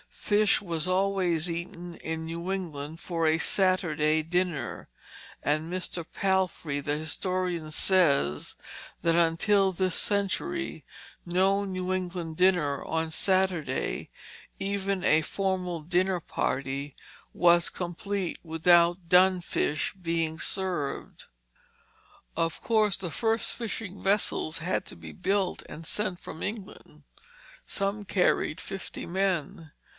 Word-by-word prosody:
Fish 210 0 +2
was 170 -3 -1
always 185 -3 +1
eaten 170 0 -6
in 160 0 -4
New 170 +3 -4
England 160 -4 -5
for 165 -2 0
a 160 +1 +4
Saturday 160 -4 +2
dinner; 165 -6 -1 0.6
and 155 +3 0
Mr. 180 -2 -2
Palfrey, 190 -6 0
the 145 +1 -1
historian, 175 +1 -2
says 145 - +2 0.5
that 165 - +3
until 175 +4 +3
this 185 0 0
century 210 - -1 0.4
no 190 +3 +2
New 185 -1 -3
England 175 -3 -3
dinner 175 -7 +3
on 160 0 -1
Saturday, 185 -6 0 0.5
even 195 -1 -1
a 155 - +5
formal 180 -1 -2
dinner 180 +2 +1
party, 135 0 -2 0.4
was 175 0 +5
complete 185 +1 -3
without 170 +1 +3
dun 185 0 +6
fish 155 -2 -1
being 165 -2 -1
served. 180 -7 -2 1.1
Of 165 -1 0
course 215 -3 +3
the 180 -4 -5
first 225 +3 0
fishing 220 -4 -5
vessels 195 -5 +1
had 170 +3 -1
to - - -10
be 80 -1 -10
built 190 - 0
and 165 - -9
sent 185 -1 -2
from 160 - -8
England. 210 -1 -7 0.6
Some 200 +1 -2
carried 180 -5 +1
fifty 195 - -6
men. 170 -4 -1
175 Hz, 115 wpm, -28 LUFS, 160-190 Hz, 1.1 s, dun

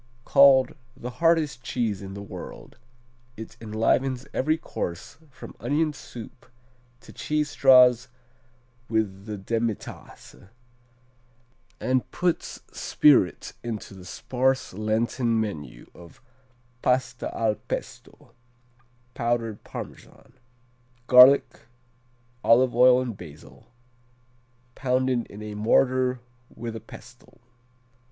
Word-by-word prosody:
Called 140 -2 +6 0.2
"The 125 -1 -6
hardest 160 -6 +2
cheese 115 -5 -2
in 95 0 -8
the 100 - -7
world." 100 - -10 0.6
It 110 0 -9
enlivens 120 +4 0
every 155 +4 +1
course 85 - -6
from 130 - -12
onion 155 +1 0
soup 120 -3 -11 0.5
to - - -15
cheese 150 -1 -2
straws 125 -2 +5 0.8
with 105 -3 -2
the 105 -1 -5
demitasse, 115 -2 -5 1.3
and 130 +1 0
puts 175 -2 -2
spirit 135 - +2
into 110 -4 -6
the 95 -2 -12
sparse 130 +6 -1
Lenten 115 +3 0
menu 75 - -5
as 85 -1 -15 0.6
Pasta 125 -1 0
al 110 -2 +1
Pesto, 105 - -8 0.8
powdered 115 -3 -2
Parmesan, - - -10 0.7
garlic, 130 +2 +6 0.8
olive 120 +1 +4
oil 125 +1 +6
and 120 -4 -5
basil, 80 -5 -14 1.1
pounded 130 -2 0
in 105 +1 -10
a 105 0 -6
mortar 125 +4 +2 0.3
with 115 0 -7
a 110 - -7
pestle. - - -15
120 Hz, 100 wpm, -25 LUFS, 105-130 Hz, 1.3 s, Called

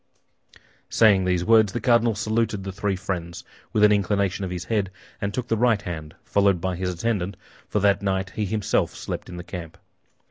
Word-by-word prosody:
'" - - -23 0.3
Saying 100 -4 +5
these 90 -1 +1
words, 110 -3 +5
the 120 - -1
cardinal 120 -1 +3
saluted 110 -1 -1
the 95 - -4
three 100 0 -1
friends 90 -3 -5 0.3
with 105 - +2
an 105 - +7
inclination 100 -1 +1
of 95 - -3
his 90 0 -5
head, 105 -3 0 0.3
and 100 - -1
took 125 +3 -3
the 115 - +1
right 110 -2 +2
hand, 80 -4 -6
followed 100 -3 +2
by 95 +1 -2
his 90 +1 -2
attendant—for 100 +1 -3
that 100 0 +3
night 95 -1 -1
he 105 +2 -2
himself 105 +1 0
slept - - -6
in 90 - -7
the 90 - -6
camp. 85 -3 -8
100 Hz, 190 wpm, -24 LUFS, 90-110 Hz, 0.3 s, an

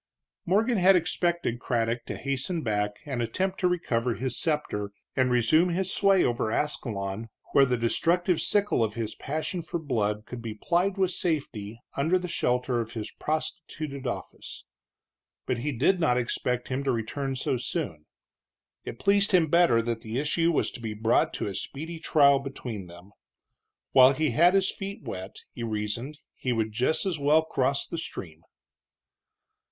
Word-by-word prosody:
Morgan 215 +5 +2
had 190 +1 +6
expected 170 -6 0
Craddock 115 -1 -1
to - - -4
hasten 140 +5 -2
back 105 -2 0
and 135 -5 -2
attempt 185 +12 -1
to 180 - +3
recover 125 -9 0
his 130 0 -3
scepter 150 -10 -1 0.3
and 130 -1 +3
resume 125 +9 +4
his 185 +2 -1
sway 195 -2 +4
over 120 -2 0
Ascalon, 110 -6 -2 0.2
where 135 -1 +5
the 125 -1 +1
destructive 170 +9 +1
sickle 205 - +2
of 110 -1 -2
his 115 -2 -3
passion 155 +5 -3
for 170 +1 -4
blood 105 -9 -1
could 125 -1 -7
be 115 -2 -5
plied 180 - 0
with 190 -2 +2
safety 120 - -3 0.2
under 160 +7 +2
the 180 0 -4
shelter 125 -6 0
of 115 0 -7
his 110 -2 -5
prostituted 155 -3 -4
office. - - -6 0.8
But 125 - -1
he 145 +5 -1
did 145 +9 +2
not 140 -7 +3
expect 125 0 -1
him 130 +1 -1
to 135 - +1
return 130 +4 -2
so 130 0 -1
soon. 115 - -4 0.8
It - - -7
pleased 200 - +3
him 165 -4 +4
better 170 -10 +5
that 115 -1 -2
the 110 +2 -4
issue 165 +4 +2
was 160 - +1
to 120 - -10
be 110 -2 -4
brought 110 +2 +2
to - - -2
a 100 - -3
speedy 160 - -5
trial 140 -4 +5
between 125 -8 -6
them. 85 +3 -14 0.8
While 130 0 +7
he 155 0 0
had 175 +10 +5
his 195 -1 +3
feet 200 +3 -6
wet, 95 +1 -6 0.2
he - - -8
reasoned, 115 +6 -3 0.2
he 125 - -2
would 110 -1 -1
just 125 - +1
as 180 -5 -1
well 150 +3 +4
cross 135 -2 0
the 170 - -4
stream. 80 - -7
135 Hz, 170 wpm, -27 LUFS, 115-170 Hz, 0.8 s, While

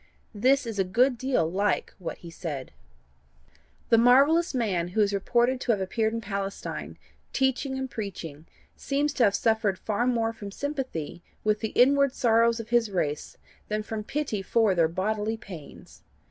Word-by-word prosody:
This 260 +6 +3
is 225 -3 -4
a - - +4
good 245 +8 +2
deal 250 -8 0
like 200 +5 0
what 175 - -5
he 170 - -11
said: 150 -7 -6 1.2
"The 230 - +6
marvellous 280 +8 +5
man 195 -8 0
who 195 +5 0
is 205 -1 +2
reported 240 +5 +1
to 240 - +1
have 205 - -2
appeared 220 +4 0
in 230 0 -3
Palestine, 200 -1 -5 0.4
teaching 265 0 0
and 265 0 -3
preaching, 175 - -7 0.3
seems 290 +1 -1
to 250 - +2
have 200 -1 +2
suffered 220 -3 +1
far 220 +5 -1
more 230 -2 +1
from 205 -3 -8
sympathy 255 - -4 0.2
with 215 0 +1
the 220 - -2
inward 275 +1 +4
sorrows 230 0 +3
of 230 - -7
his 235 -2 +2
race 150 -6 -2 0.3
than 215 0 -2
from 215 0 -5
pity 265 -5 -2
for 215 +1 +2
their 170 -3 +3
bodily 210 +5 -2
pains. 175 -9 -12
220 Hz, 165 wpm, -27 LUFS, 195-250 Hz, 1.2 s, The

